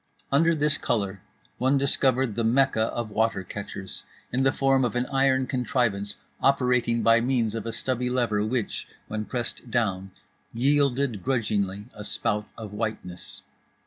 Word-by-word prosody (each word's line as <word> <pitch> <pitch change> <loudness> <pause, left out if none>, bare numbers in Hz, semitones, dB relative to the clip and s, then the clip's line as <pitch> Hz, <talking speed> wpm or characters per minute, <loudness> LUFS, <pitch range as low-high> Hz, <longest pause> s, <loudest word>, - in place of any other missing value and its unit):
Under 165 +4 +4
this 150 0 +2
colour 100 -4 -1 0.4
one 130 +3 +3
discovered 135 -3 +2
the 115 - -1
Mecca 115 -1 +3
of 115 -1 -4
water 110 -2 +1
catchers 95 0 -7 0.3
in 130 - +2
the 135 0 +4
form 135 -1 +2
of 120 -3 0
an 125 +1 +1
iron 135 -1 +3
contrivance 120 -5 0 0.3
operating 125 -4 +2
by 115 +1 +5
means 120 -3 +1
of 115 0 -4
a - - -2
stubby 125 +2 -1
lever 120 -5 +1
which, 115 0 -2 0.2
when 110 0 -3
pressed 120 0 -4
down, 100 -5 0 0.5
yielded 135 -3 +2
grudgingly 105 -5 -1
a 105 - -8
spout 105 0 -1
of 110 -3 -7
whiteness. 105 -5 -5
120 Hz, 145 wpm, -26 LUFS, 105-130 Hz, 0.5 s, by